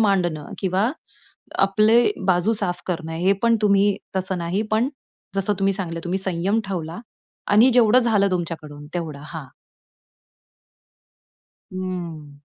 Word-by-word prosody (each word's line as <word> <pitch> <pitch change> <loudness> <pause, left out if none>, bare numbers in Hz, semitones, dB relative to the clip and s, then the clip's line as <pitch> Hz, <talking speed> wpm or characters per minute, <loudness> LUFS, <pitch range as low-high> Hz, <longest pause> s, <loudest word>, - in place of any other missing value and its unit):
मांडणं 175 -8 +1
किंवा 195 +5 +1 0.8
आपले 215 +4 +4 0.3
बाजू 185 +5 +3
साफ 175 -2 -2
करणं 165 -2 -3
हे 185 +4 +2
पण 230 0 +4
तुम्ही 200 -1 +3 0.2
तसं 185 0 -1
नाही, 175 +4 -1
पण 230 +5 +2 0.5
जसं 195 +1 +1
तुम्ही 195 0 +2
सांगितलं 170 -4 -2
तुम्ही 185 +2 -1
संयम 190 +3 0
ठेवला 170 -1 -4 0.5
आणि 225 +5 +7
जेवढं 245 0 +6
झालं 210 -5 +2
तुमच्याकडून 155 -4 -4
तेवढं, 160 -5 -4
हां. 160 -4 -7 2.3
हं. 170 -6 -6
185 Hz, 120 wpm, -22 LUFS, 170-205 Hz, 2.3 s, आणि